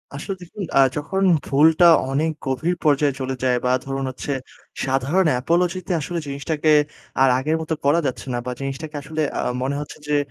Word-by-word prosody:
আসলে 190 Hz, +7 st, -4 dB
দেখুন, 180 Hz, +3 st, -7 dB
আ -, -, +7 dB, 0.2 s
যখন 185 Hz, +6 st, -2 dB, 0.2 s
ভুলটা 160 Hz, +5 st, +4 dB, 0.3 s
অনেক 155 Hz, +4 st, +1 dB
গভীর 155 Hz, +7 st, 0 dB
পর্যায়ে 145 Hz, -2 st, +3 dB
চলে 130 Hz, 0 st, -2 dB
যায় 125 Hz, -1 st, +3 dB
বা, 125 Hz, -, +3 dB
ধরুন 135 Hz, 0 st, -3 dB
হচ্ছে, 130 Hz, +2 st, -5 dB, 0.5 s
সাধারণ 135 Hz, +7 st, +1 dB
apology 170 Hz, +6 st, +1 dB
তে -, -, -2 dB
আসলে 170 Hz, +4 st, -3 dB
জিনিসটাকে 145 Hz, +3 st, -1 dB, 0.5 s
আর 135 Hz, -, +6 dB
আগের 150 Hz, +5 st, 0 dB
মত 160 Hz, -, -7 dB
করা 145 Hz, +4 st, +4 dB
যাচ্ছে 130 Hz, -, -5 dB
না 120 Hz, -, -1 dB
বা, 125 Hz, -, -3 dB
জিনিসটাকে 135 Hz, +3 st, -5 dB
আসলে 155 Hz, +2 st, -4 dB, 0.2 s
আ -, -, +1 dB, 0.2 s
মনে 135 Hz, +2 st, -1 dB
হচ্ছে 150 Hz, -, -9 dB
যে, 150 Hz, -, +1 dB
145 Hz, 180 wpm, -22 LUFS, 135-160 Hz, 0.5 s, আ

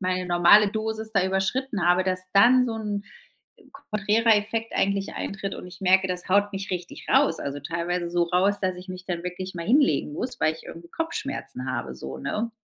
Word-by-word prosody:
meine 185 Hz, -1 st, -1 dB
normale 175 Hz, +4 st, +6 dB
Dosis 220 Hz, 0 st, -3 dB
da 195 Hz, -3 st, +3 dB
überschritten 195 Hz, +3 st, -1 dB
habe, 180 Hz, +1 st, +4 dB
dass 185 Hz, -1 st, 0 dB
dann 245 Hz, +5 st, +6 dB
so 230 Hz, -, -3 dB
'n 205 Hz, -2 st, -3 dB, 0.9 s
konträrer 215 Hz, +2 st, +3 dB
Effekt 225 Hz, +2 st, -2 dB
eigentlich 200 Hz, 0 st, 0 dB
eintritt 195 Hz, 0 st, -4 dB
und -, -, -9 dB
ich 180 Hz, 0 st, -13 dB
merke, 190 Hz, 0 st, +4 dB
das 180 Hz, -1 st, -4 dB
haut 205 Hz, +2 st, +3 dB
mich 195 Hz, +1 st, -5 dB
richtig 180 Hz, -1 st, -6 dB
raus. 165 Hz, -, +3 dB
Also 140 Hz, 0 st, -4 dB
teilweise 170 Hz, +3 st, -3 dB
so 175 Hz, 0 st, +2 dB
raus, 185 Hz, +4 st, +2 dB
dass 185 Hz, -1 st, -1 dB
ich 180 Hz, +1 st, -11 dB
mich 185 Hz, 0 st, -7 dB
dann 175 Hz, -2 st, -3 dB
wirklich 185 Hz, +1 st, -5 dB
mal 170 Hz, -1 st, -5 dB
hinlegen 230 Hz, -, +3 dB
muss, 250 Hz, -, -5 dB
weil 155 Hz, -, +2 dB
ich 160 Hz, -, -14 dB
irgendwie 170 Hz, +1 st, -10 dB
Kopfschmerzen 280 Hz, -, -4 dB
habe 120 Hz, -, -4 dB
so, 65 Hz, +1 st, -7 dB
ne? 220 Hz, -, -3 dB
190 Hz, 195 wpm, -25 LUFS, 175-210 Hz, 0.9 s, normale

